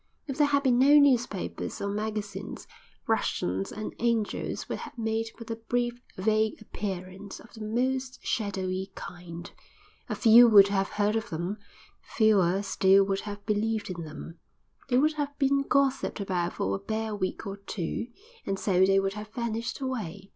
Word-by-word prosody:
If 275 Hz, 0 st, -5 dB
there 295 Hz, -, +5 dB
had 280 Hz, -1 st, +2 dB
been 250 Hz, -3 st, +3 dB
no 280 Hz, +3 st, +7 dB
newspapers 250 Hz, -8 st, +1 dB
or 200 Hz, -, -2 dB
magazines 205 Hz, -1 st, -4 dB, 0.4 s
Russians 95 Hz, +2 st, -1 dB
and 215 Hz, -, -5 dB
Angels 230 Hz, -2 st, -1 dB
would -, -, -4 dB
have -, -, -9 dB
made 225 Hz, 0 st, -1 dB
but 230 Hz, 0 st, -8 dB
a 225 Hz, -, -3 dB
brief, 240 Hz, +1 st, -2 dB, 0.2 s
vague 215 Hz, +2 st, +1 dB
appearance 190 Hz, -2 st, -6 dB
of 225 Hz, -, -16 dB
the 220 Hz, -, -11 dB
most 255 Hz, +4 st, -1 dB
shadowy 190 Hz, -3 st, -2 dB
kind—a 175 Hz, -1 st, -10 dB
few 235 Hz, +1 st, +8 dB
would 200 Hz, -3 st, +8 dB
have 195 Hz, -1 st, 0 dB
heard 210 Hz, +1 st, 0 dB
of 225 Hz, -, -2 dB
them, 175 Hz, +6 st, -3 dB, 0.4 s
fewer 200 Hz, -4 st, +2 dB
still 195 Hz, 0 st, +4 dB
would 195 Hz, 0 st, -1 dB
have 205 Hz, 0 st, -8 dB
believed 215 Hz, -1 st, -1 dB
in 170 Hz, -2 st, -5 dB
them, 160 Hz, +2 st, -9 dB, 0.5 s
they 250 Hz, -, +3 dB
would 305 Hz, +4 st, +3 dB
have 285 Hz, 0 st, -4 dB
been 275 Hz, 0 st, +3 dB
gossiped 275 Hz, -3 st, +1 dB
about 180 Hz, -3 st, -1 dB
for -, -, -1 dB
a -, -, -4 dB
bare 220 Hz, +1 st, -3 dB
week 185 Hz, -2 st, -3 dB
or 200 Hz, 0 st, -5 dB
two, 200 Hz, +1 st, -4 dB, 0.4 s
and 195 Hz, -, -2 dB
so 190 Hz, -2 st, +2 dB
they 195 Hz, +1 st, +5 dB
would 195 Hz, 0 st, -1 dB
have 210 Hz, 0 st, -7 dB
vanished 235 Hz, +2 st, -3 dB
away. 205 Hz, -8 st, -4 dB
210 Hz, 165 wpm, -28 LUFS, 195-235 Hz, 0.5 s, few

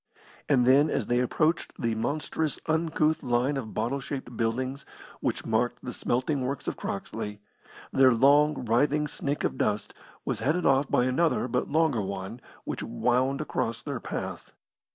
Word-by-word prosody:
And 125 Hz, -4 st, +4 dB
then, 140 Hz, +4 st, +5 dB
as -, -, 0 dB
they 120 Hz, 0 st, +1 dB
approached 155 Hz, +6 st, 0 dB
the 115 Hz, -2 st, 0 dB
monstrous, 150 Hz, +6 st, -2 dB
uncouth 160 Hz, -1 st, +1 dB
line 125 Hz, +4 st, +1 dB
of 125 Hz, -5 st, -5 dB
bottle 120 Hz, +6 st, 0 dB
shaped 130 Hz, -2 st, -6 dB
buildings 130 Hz, +4 st, -1 dB, 0.4 s
which -, -, -2 dB
marked 120 Hz, +2 st, 0 dB
the 125 Hz, -, -4 dB
smelting 130 Hz, +4 st, 0 dB
works 135 Hz, +2 st, -3 dB
of -, -, -1 dB
Croxley, 105 Hz, +1 st, -5 dB, 0.5 s
their 130 Hz, -1 st, +6 dB
long, 140 Hz, +3 st, +4 dB
writhing 145 Hz, +6 st, +2 dB
snake 145 Hz, 0 st, -2 dB
of -, -, -1 dB
dust 105 Hz, 0 st, 0 dB, 0.3 s
was -, -, -1 dB
headed 160 Hz, +6 st, 0 dB
off 135 Hz, +1 st, +3 dB
by 125 Hz, -, +3 dB
another 130 Hz, +2 st, +1 dB
but 125 Hz, 0 st, -1 dB
longer 155 Hz, -6 st, +2 dB
one 95 Hz, +4 st, -5 dB, 0.2 s
which -, -, -4 dB
wound 130 Hz, -, +1 dB
across 115 Hz, -6 st, -2 dB
their -, -, -4 dB
path. -, -, -6 dB
130 Hz, 155 wpm, -28 LUFS, 120-145 Hz, 0.5 s, their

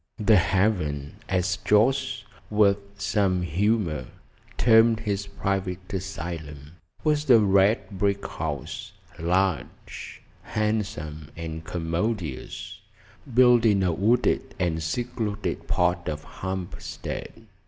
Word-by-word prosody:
"The 110 Hz, 0 st, +5 dB
Haven," 85 Hz, -7 st, +1 dB
as 90 Hz, -1 st, +1 dB
Jorce, 130 Hz, +3 st, +2 dB, 0.3 s
with 105 Hz, -1 st, +4 dB, 0.2 s
some 95 Hz, -4 st, +1 dB
humour, 90 Hz, -, 0 dB, 0.5 s
termed 115 Hz, -1 st, +5 dB
his 100 Hz, -2 st, -2 dB
private 95 Hz, -2 st, -3 dB
asylum, 80 Hz, -6 st, -5 dB, 0.3 s
was 150 Hz, -2 st, +1 dB
a 120 Hz, -, +9 dB
red 100 Hz, 0 st, +3 dB
brick 100 Hz, 0 st, +1 dB
house, 70 Hz, -2 st, -5 dB, 0.3 s
large, 90 Hz, -4 st, -2 dB, 0.2 s
handsome, 95 Hz, -9 st, -2 dB
and 80 Hz, -1 st, -5 dB
commodious, 85 Hz, -, -3 dB, 0.5 s
built 125 Hz, -1 st, +6 dB
in 100 Hz, -4 st, +4 dB
a 90 Hz, -2 st, +2 dB
wooded 110 Hz, +8 st, +1 dB
and 80 Hz, -3 st, 0 dB
secluded 105 Hz, +4 st, -3 dB
part 90 Hz, 0 st, +1 dB
of 75 Hz, 0 st, -4 dB
Hampstead. 95 Hz, +4 st, -6 dB
95 Hz, 100 wpm, -26 LUFS, 85-110 Hz, 0.5 s, a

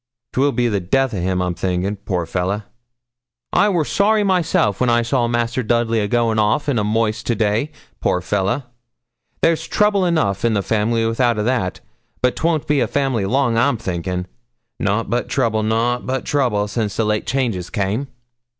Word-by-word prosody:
'Twill 140 Hz, +2 st, +2 dB
be 125 Hz, -2 st, +1 dB
the 105 Hz, -3 st, 0 dB
death 130 Hz, +8 st, +1 dB
o' 95 Hz, -, -2 dB
him, 90 Hz, 0 st, 0 dB
I'm 90 Hz, -1 st, -1 dB
thinkin', 90 Hz, +3 st, -1 dB
poor 95 Hz, -2 st, -3 dB
old 85 Hz, -, -7 dB
fellah. 95 Hz, +3 st, -2 dB, 0.9 s
I 205 Hz, -, +4 dB
wor 170 Hz, -6 st, +1 dB
sorry 210 Hz, +4 st, +2 dB
myself 165 Hz, -, +1 dB
when 125 Hz, -, +3 dB
I 120 Hz, 0 st, +3 dB
saw 120 Hz, 0 st, +1 dB
Master 120 Hz, +1 st, 0 dB
Dudley 115 Hz, -1 st, +1 dB
a 105 Hz, -, 0 dB
going 115 Hz, 0 st, +1 dB
off 110 Hz, +8 st, +1 dB
in 140 Hz, -4 st, +1 dB
the 105 Hz, -, +1 dB
moist 110 Hz, +1 st, 0 dB
to 120 Hz, -, +1 dB
day, 110 Hz, +7 st, 0 dB, 0.3 s
poor 90 Hz, -, +1 dB
fellah. 100 Hz, +8 st, -1 dB, 0.8 s
There's 165 Hz, -1 st, +2 dB
trouble 210 Hz, -2 st, +2 dB
enough 105 Hz, -, 0 dB
in 115 Hz, -2 st, +2 dB
the 100 Hz, -, 0 dB
family 115 Hz, +2 st, +1 dB
without 115 Hz, 0 st, +1 dB
a' 105 Hz, -, 0 dB
that; 115 Hz, -6 st, -1 dB, 0.4 s
but 125 Hz, -, +2 dB
'twon't 160 Hz, -2 st, 0 dB
be 150 Hz, -1 st, +2 dB
a -, -, +2 dB
family 130 Hz, -8 st, 0 dB
long, 120 Hz, 0 st, +2 dB
I'm 120 Hz, +1 st, +2 dB
thinkin'. 90 Hz, -1 st, -3 dB, 0.5 s
Nout 105 Hz, +3 st, 0 dB
but 120 Hz, 0 st, -1 dB
trouble, 110 Hz, -2 st, +1 dB
nout 115 Hz, +3 st, 0 dB
but 130 Hz, 0 st, -2 dB
trouble, 120 Hz, -8 st, +1 dB
since 105 Hz, -1 st, -3 dB
late 105 Hz, -1 st, 0 dB
changes 115 Hz, -9 st, -1 dB
came.' 105 Hz, +5 st, -1 dB
115 Hz, 185 wpm, -20 LUFS, 105-130 Hz, 0.9 s, I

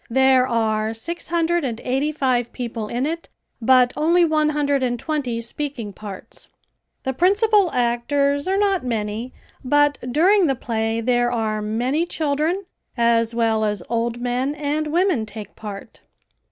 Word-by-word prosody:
There 260 Hz, +1 st, +4 dB
are 220 Hz, -2 st, 0 dB
six 340 Hz, +10 st, -5 dB
hundred 340 Hz, 0 st, +1 dB
and 235 Hz, -4 st, -3 dB
eighty 270 Hz, +4 st, 0 dB
five 255 Hz, -5 st, 0 dB
people 235 Hz, -3 st, -4 dB
in 245 Hz, +4 st, -2 dB
it, 330 Hz, +2 st, -4 dB, 0.3 s
but 250 Hz, +1 st, +4 dB
only 340 Hz, +3 st, +3 dB
one 310 Hz, -1 st, +2 dB
hundred 285 Hz, -2 st, +1 dB
and 245 Hz, -1 st, 0 dB
twenty 265 Hz, -4 st, -2 dB
speaking 235 Hz, -3 st, -5 dB
parts. 200 Hz, -1 st, -10 dB, 0.6 s
The 265 Hz, -, -1 dB
principal 400 Hz, -, +3 dB
actors 280 Hz, +5 st, 0 dB
are 385 Hz, +1 st, +1 dB
not 395 Hz, -4 st, +1 dB
many, 225 Hz, 0 st, -3 dB, 0.3 s
but 290 Hz, +2 st, +3 dB
during 365 Hz, +6 st, +4 dB
the 270 Hz, -, +1 dB
play 225 Hz, -1 st, -2 dB
there 240 Hz, 0 st, +1 dB
are 220 Hz, -3 st, -1 dB
many 250 Hz, +10 st, -1 dB
children 315 Hz, +5 st, -1 dB, 0.3 s
as 235 Hz, -1 st, +2 dB
well 225 Hz, -2 st, +1 dB
as 210 Hz, -4 st, -1 dB
old 235 Hz, 0 st, -1 dB
men 250 Hz, +4 st, -1 dB
and 300 Hz, +1 st, -2 dB
women 340 Hz, -, +1 dB
take 210 Hz, -1 st, -9 dB
part. 205 Hz, -2 st, -9 dB
255 Hz, 150 wpm, -22 LUFS, 230-305 Hz, 0.6 s, There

